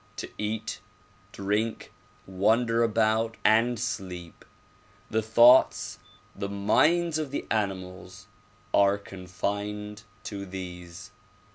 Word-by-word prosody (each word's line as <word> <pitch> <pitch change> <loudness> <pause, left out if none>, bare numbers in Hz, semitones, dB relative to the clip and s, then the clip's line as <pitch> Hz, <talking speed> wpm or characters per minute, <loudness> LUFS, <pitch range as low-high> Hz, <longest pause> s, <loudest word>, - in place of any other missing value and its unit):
To - - -5
eat, 105 +1 -3 0.5
drink, 105 +3 -2 0.3
wander 115 +5 +2
about 115 0 +1
and 115 +2 +4
sleep. 90 -7 -5 0.7
The 110 - +1
thoughts, 120 +4 +5 0.4
the 100 0 -4
minds 155 +12 +2
of 155 -3 -3
the 140 - -4
animals 95 -2 -3 0.5
are 100 0 +4
con 95 -2 -11
fined 105 +3 -4 0.2
to 100 -3 -6
these. 90 -2 -8
105 Hz, 100 wpm, -27 LUFS, 95-115 Hz, 0.7 s, thoughts